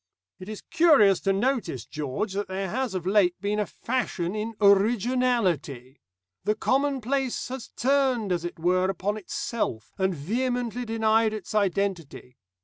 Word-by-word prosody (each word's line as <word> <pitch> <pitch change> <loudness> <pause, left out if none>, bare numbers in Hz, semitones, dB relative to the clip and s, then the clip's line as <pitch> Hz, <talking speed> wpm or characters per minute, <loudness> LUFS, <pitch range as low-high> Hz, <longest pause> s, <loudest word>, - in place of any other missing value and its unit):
"It 185 +2 -9
is 215 - -7
curious 275 - +5
to 195 - +1
notice, 195 - -1
George, 150 - -4
that 200 +1 -2
there 190 -1 -3
has 255 -6 -2
of 180 -2 -3
late 190 -2 +3
been 205 +2 -1
a 210 - 0
fashion 215 -8 -2
in 215 +1 -4
'originality.' 200 - +2 0.4
The 210 - +1
commonplace 270 0 0
has 260 -2 -6
turned, 260 -6 +1
as 175 -2 0
it 175 - -5
were, 185 +3 +2
upon 195 +2 -1
itself, 215 - -4
and 190 -1 +1
vehemently 245 - -2
denied 220 -1 +2
its 210 -2 -7
identity. 190 -10 -1
210 Hz, 145 wpm, -26 LUFS, 185-245 Hz, 0.4 s, curious